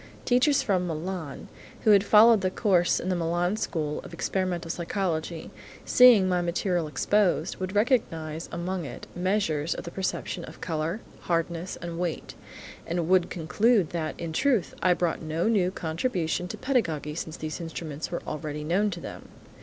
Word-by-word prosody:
Teachers 260 Hz, +3 st, +3 dB
from 185 Hz, -7 st, +1 dB
Milan 165 Hz, -2 st, -5 dB, 0.4 s
who 215 Hz, -, +5 dB
had 200 Hz, -1 st, +6 dB
followed 215 Hz, +1 st, +7 dB
the 185 Hz, -, +1 dB
course 185 Hz, -3 st, +2 dB
in 185 Hz, -, -3 dB
the 185 Hz, -, +1 dB
Milan 175 Hz, +3 st, 0 dB
school 155 Hz, -8 st, -2 dB
of 170 Hz, -, -10 dB
experimental 175 Hz, -2 st, -2 dB
psychology, 170 Hz, -2 st, -3 dB, 0.3 s
seeing 245 Hz, -7 st, +7 dB
my 180 Hz, -1 st, +1 dB
material 175 Hz, -1 st, 0 dB
exposed, 175 Hz, +3 st, +1 dB
would 185 Hz, +1 st, -4 dB
recognise 165 Hz, -, 0 dB
among 175 Hz, +1 st, -3 dB
it, 130 Hz, -5 st, -8 dB
measures 175 Hz, -5 st, 0 dB
of -, -, -6 dB
the 170 Hz, -, -7 dB
perception 185 Hz, -2 st, -3 dB
of -, -, -12 dB
colour, 165 Hz, +5 st, -2 dB, 0.2 s
hardness, 170 Hz, 0 st, -2 dB
and 170 Hz, -1 st, -5 dB
weight, 175 Hz, -3 st, -3 dB, 0.5 s
and 170 Hz, -1 st, -1 dB
would 185 Hz, -1 st, +4 dB
conclude 195 Hz, +3 st, +2 dB
that, 160 Hz, -2 st, -3 dB
in 165 Hz, -1 st, -4 dB
truth, 245 Hz, -, +1 dB
I 180 Hz, 0 st, +4 dB
brought 175 Hz, -2 st, -1 dB
no 160 Hz, +4 st, -1 dB
new 200 Hz, -6 st, +3 dB
contribution 175 Hz, 0 st, -2 dB
to -, -, -6 dB
pedagogy 165 Hz, -, -1 dB
since 160 Hz, 0 st, -5 dB
these 155 Hz, +2 st, -5 dB
instruments 160 Hz, -2 st, -5 dB
were 175 Hz, -, -4 dB
already 150 Hz, -1 st, -4 dB
known 190 Hz, +7 st, +1 dB
to 175 Hz, -3 st, -5 dB
them. -, -, -9 dB
175 Hz, 160 wpm, -27 LUFS, 160-195 Hz, 0.5 s, followed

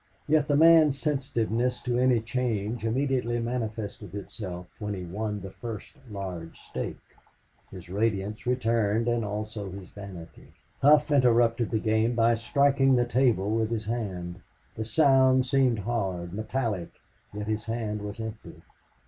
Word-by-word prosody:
Yet 150 Hz, -1 st, +3 dB
the 145 Hz, -, +2 dB
man's 160 Hz, -2 st, +6 dB
sensitiveness 125 Hz, -4 st, -1 dB
to 120 Hz, 0 st, 0 dB
any 125 Hz, -2 st, +3 dB
change 115 Hz, -1 st, -2 dB
immediately 125 Hz, -1 st, 0 dB
manifested 110 Hz, -4 st, -4 dB
itself 95 Hz, -3 st, -6 dB
when 105 Hz, -1 st, -3 dB
he 90 Hz, -2 st, -6 dB
won 105 Hz, +3 st, -3 dB
the 95 Hz, +1 st, -8 dB
first 115 Hz, -1 st, -8 dB
large 95 Hz, -5 st, -6 dB
stake. -, -, -5 dB, 0.7 s
His 90 Hz, -3 st, -10 dB
radiance 105 Hz, +2 st, -1 dB
returned 115 Hz, -3 st, +1 dB
and 120 Hz, -1 st, +1 dB
also 105 Hz, 0 st, -4 dB
his 95 Hz, 0 st, -9 dB
vanity. 95 Hz, -5 st, -11 dB, 0.3 s
Hough 150 Hz, +2 st, +5 dB
interrupted 120 Hz, -4 st, +3 dB
the 110 Hz, -, 0 dB
game 110 Hz, +2 st, +1 dB
by 115 Hz, 0 st, +4 dB
striking 135 Hz, +3 st, +3 dB
the 120 Hz, -1 st, +3 dB
table 120 Hz, -5 st, +2 dB
with 110 Hz, 0 st, +1 dB
his 110 Hz, -2 st, -2 dB
hand. 95 Hz, -6 st, -4 dB, 0.3 s
The 110 Hz, -, -4 dB
sound 130 Hz, +1 st, +4 dB
seemed 130 Hz, -2 st, +2 dB
hard, 95 Hz, -6 st, -2 dB
metallic, 110 Hz, -4 st, -2 dB, 0.4 s
yet 105 Hz, 0 st, -5 dB
his 110 Hz, 0 st, -2 dB
hand 110 Hz, -2 st, -3 dB
was 105 Hz, +1 st, -6 dB
empty. 110 Hz, -1 st, -8 dB
115 Hz, 140 wpm, -27 LUFS, 105-125 Hz, 0.7 s, man's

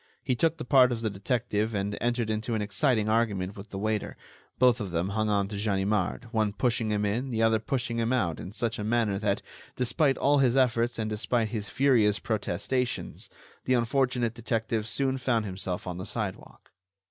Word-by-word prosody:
He 130 Hz, -, 0 dB
took 165 Hz, +6 st, +1 dB
the -, -, -6 dB
part 125 Hz, -1 st, +5 dB
of 115 Hz, -2 st, -2 dB
the 110 Hz, -2 st, -1 dB
detective 110 Hz, +1 st, -1 dB
and 100 Hz, +1 st, -1 dB
entered 120 Hz, -2 st, 0 dB
into 110 Hz, +2 st, -2 dB
an 110 Hz, -, -1 dB
exciting 110 Hz, +1 st, +1 dB
argument 105 Hz, -4 st, 0 dB
with 100 Hz, 0 st, -10 dB
the 95 Hz, -, -6 dB
waiter; 110 Hz, +1 st, -2 dB, 0.4 s
both 125 Hz, -3 st, +4 dB
of 100 Hz, -, -3 dB
them 85 Hz, +2 st, -1 dB
hung 110 Hz, +1 st, 0 dB
on 100 Hz, -1 st, +1 dB
to 105 Hz, -, -5 dB
Ganimard, 100 Hz, -1 st, 0 dB
one 110 Hz, -3 st, +1 dB
pushing 115 Hz, 0 st, 0 dB
him 105 Hz, -1 st, 0 dB
in, 120 Hz, +6 st, -1 dB
the 115 Hz, -2 st, 0 dB
other 110 Hz, -1 st, +4 dB
pushing 120 Hz, 0 st, -2 dB
him 115 Hz, +1 st, 0 dB
out 90 Hz, -11 st, 0 dB
in 90 Hz, -, -7 dB
such 115 Hz, +1 st, -2 dB
a -, -, -2 dB
manner 110 Hz, -3 st, +1 dB
that, 100 Hz, -2 st, 0 dB, 0.3 s
despite 135 Hz, +3 st, +1 dB
all 145 Hz, +1 st, +3 dB
his 130 Hz, -1 st, +3 dB
efforts 120 Hz, -2 st, +2 dB
and 110 Hz, -1 st, -2 dB
despite 110 Hz, +1 st, 0 dB
his 105 Hz, -3 st, -4 dB
furious 115 Hz, -5 st, +3 dB
protestations, 110 Hz, +4 st, -2 dB, 0.4 s
the 130 Hz, -, +3 dB
unfortunate 125 Hz, -1 st, +1 dB
detective 115 Hz, -2 st, -2 dB
soon 130 Hz, +4 st, 0 dB
found 120 Hz, -4 st, +1 dB
himself 95 Hz, -2 st, -3 dB
on 90 Hz, -1 st, -5 dB
the 95 Hz, -, -5 dB
sidewalk. 105 Hz, -5 st, -5 dB
110 Hz, 195 wpm, -28 LUFS, 105-125 Hz, 0.4 s, part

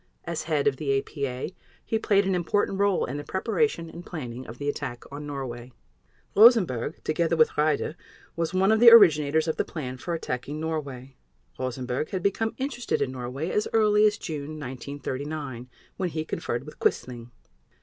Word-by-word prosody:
As -, -, -3 dB
head 155 Hz, -3 st, 0 dB
of 135 Hz, -2 st, +2 dB
the 140 Hz, -2 st, +1 dB
APA, 135 Hz, +1 st, -4 dB, 0.3 s
he 225 Hz, -, 0 dB
played 200 Hz, -2 st, +3 dB
an 190 Hz, -, +1 dB
important 190 Hz, +2 st, 0 dB
role 200 Hz, -2 st, +2 dB
in 140 Hz, -, -5 dB
the 145 Hz, -, -5 dB
preparation 220 Hz, -, 0 dB
and 170 Hz, +2 st, -10 dB
planning 130 Hz, -8 st, -7 dB
of 115 Hz, -, -9 dB
the 145 Hz, -, -5 dB
attack 120 Hz, -4 st, -3 dB
on 145 Hz, +1 st, -7 dB
Norway. 125 Hz, -3 st, -6 dB, 0.6 s
Rosenberg, 195 Hz, -, +5 dB
together 165 Hz, +1 st, +1 dB
with 155 Hz, -1 st, +4 dB
Raeder, 150 Hz, 0 st, +1 dB, 0.4 s
was 165 Hz, -1 st, -1 dB
one 190 Hz, +3 st, +3 dB
of 220 Hz, -, +4 dB
the 235 Hz, 0 st, +10 dB
originators 160 Hz, -8 st, +6 dB
of 160 Hz, -, -1 dB
the -, -, +2 dB
plan 130 Hz, -5 st, -6 dB
for 170 Hz, +6 st, -3 dB
attacking 145 Hz, -1 st, -4 dB
Norway. 140 Hz, -5 st, -5 dB, 0.4 s
Rosenberg 130 Hz, +2 st, -3 dB
had 185 Hz, -2 st, -3 dB
become 220 Hz, +3 st, 0 dB
interested 255 Hz, -3 st, -2 dB
in 130 Hz, -, -1 dB
Norway 130 Hz, +6 st, -4 dB
as 210 Hz, -, 0 dB
early 210 Hz, -1 st, +5 dB
as 210 Hz, 0 st, 0 dB
June 155 Hz, -3 st, -6 dB
1939, 135 Hz, 0 st, -5 dB, 0.3 s
when 185 Hz, -2 st, -1 dB
he 155 Hz, -1 st, -3 dB
conferred 120 Hz, -4 st, -3 dB
with 150 Hz, -, -12 dB
Quisling. 120 Hz, -2 st, -1 dB
155 Hz, 170 wpm, -26 LUFS, 130-185 Hz, 0.6 s, the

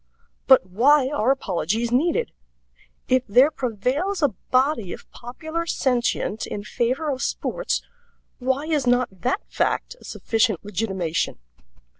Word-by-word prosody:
But 265 Hz, -8 st, +7 dB
why 260 Hz, +9 st, +4 dB
are 265 Hz, -5 st, 0 dB
apologies 225 Hz, -, 0 dB
needed? 340 Hz, -, +1 dB, 0.8 s
If 255 Hz, 0 st, +3 dB
there 255 Hz, +8 st, +5 dB
prevails 275 Hz, -, -1 dB
a 290 Hz, -, +5 dB, 0.2 s
body 255 Hz, -, +1 dB
of -, -, -11 dB
popular 315 Hz, +7 st, -5 dB
sentient 240 Hz, -6 st, 0 dB
in 205 Hz, -, -5 dB
favor 255 Hz, +8 st, -1 dB
of 260 Hz, -1 st, -4 dB
sports, -, -, -2 dB, 0.6 s
why 265 Hz, +3 st, 0 dB
is 300 Hz, -5 st, 0 dB
not 245 Hz, 0 st, +3 dB
that 255 Hz, -, 0 dB
fact -, -, -1 dB
a -, -, -15 dB
sufficient 220 Hz, -5 st, 0 dB
legitimation? 190 Hz, -5 st, -2 dB
255 Hz, 125 wpm, -23 LUFS, 220-290 Hz, 0.8 s, But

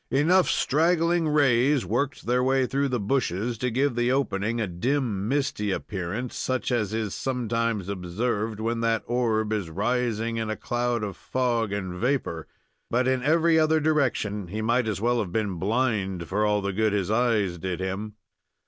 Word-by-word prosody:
Enough 165 Hz, +8 st, +3 dB
straggling 165 Hz, +2 st, +2 dB
rays 140 Hz, -3 st, +3 dB
worked 130 Hz, -, -2 dB
their 125 Hz, +1 st, +2 dB
way 130 Hz, 0 st, +2 dB
through 140 Hz, +2 st, 0 dB
the 125 Hz, -2 st, -1 dB
bushes 115 Hz, 0 st, -1 dB
to 125 Hz, -, 0 dB
give 130 Hz, +3 st, +1 dB
the 120 Hz, +1 st, +1 dB
opening 115 Hz, -4 st, 0 dB
a 110 Hz, -, +1 dB
dim, 105 Hz, +2 st, -1 dB
misty 135 Hz, -6 st, 0 dB
appearance, 100 Hz, +6 st, -4 dB
such 130 Hz, 0 st, -2 dB
as 110 Hz, -5 st, 0 dB
is 110 Hz, -2 st, -2 dB
sometimes 115 Hz, -5 st, -1 dB
observed 105 Hz, +4 st, -2 dB
when 115 Hz, +1 st, -1 dB
that 115 Hz, -1 st, +1 dB
orb 110 Hz, -3 st, 0 dB
is 100 Hz, -6 st, -2 dB
rising 115 Hz, +4 st, -1 dB
in 110 Hz, -1 st, -2 dB
a 110 Hz, -, -2 dB
cloud 120 Hz, -2 st, -1 dB
of 100 Hz, -3 st, -4 dB
fog 120 Hz, -3 st, -1 dB
and 95 Hz, -3 st, -4 dB
vapor; 120 Hz, -, -1 dB, 0.4 s
but 125 Hz, +2 st, +1 dB
in 130 Hz, -1 st, +1 dB
every 160 Hz, +3 st, +3 dB
other 155 Hz, 0 st, +3 dB
direction 130 Hz, -, 0 dB
he 105 Hz, +5 st, -5 dB
might 120 Hz, +2 st, +1 dB
as 105 Hz, -2 st, -2 dB
well 120 Hz, +2 st, +1 dB
have 100 Hz, -6 st, -3 dB
been 100 Hz, -4 st, -1 dB
blind, 100 Hz, -5 st, 0 dB
for 105 Hz, +2 st, +1 dB
all 105 Hz, -1 st, +1 dB
the 100 Hz, 0 st, -1 dB
good 110 Hz, +1 st, +1 dB
his 100 Hz, -1 st, 0 dB
eyes 110 Hz, -6 st, +1 dB
did 90 Hz, 0 st, -3 dB
him. 95 Hz, +3 st, -4 dB
115 Hz, 175 wpm, -26 LUFS, 105-130 Hz, 0.4 s, Enough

